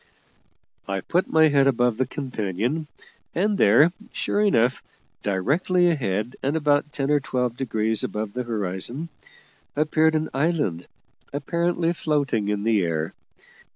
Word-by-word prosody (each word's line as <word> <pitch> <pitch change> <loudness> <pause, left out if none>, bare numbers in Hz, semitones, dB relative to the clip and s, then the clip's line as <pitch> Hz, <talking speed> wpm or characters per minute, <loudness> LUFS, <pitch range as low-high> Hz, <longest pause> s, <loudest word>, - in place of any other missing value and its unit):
I 95 -1 -2
put 180 - 0
my 160 0 +5
head 140 -1 +4
above 125 -3 +2
the 130 -1 0
companion, 125 - -3 0.5
and 200 +3 +1
there, 145 +12 +6 0.2
sure 205 - -1
enough, 125 - +2 0.4
directly 165 - +2
ahead, 115 - -2
and 140 +4 0
about 145 -1 +1
ten 140 0 -1
or 145 - +4
twelve 125 -3 -2
degrees 110 -4 -1
above 105 -1 -3
the 125 - -2
horizon, 115 - -4 0.7
appeared 155 +1 +2
an 155 0 0
island 140 - 0 0.4
apparently 170 +3 0
floating 140 -10 0
in 105 -1 -1
the 110 -2 +3
air. 80 -2 -2
135 Hz, 130 wpm, -24 LUFS, 110-155 Hz, 0.7 s, there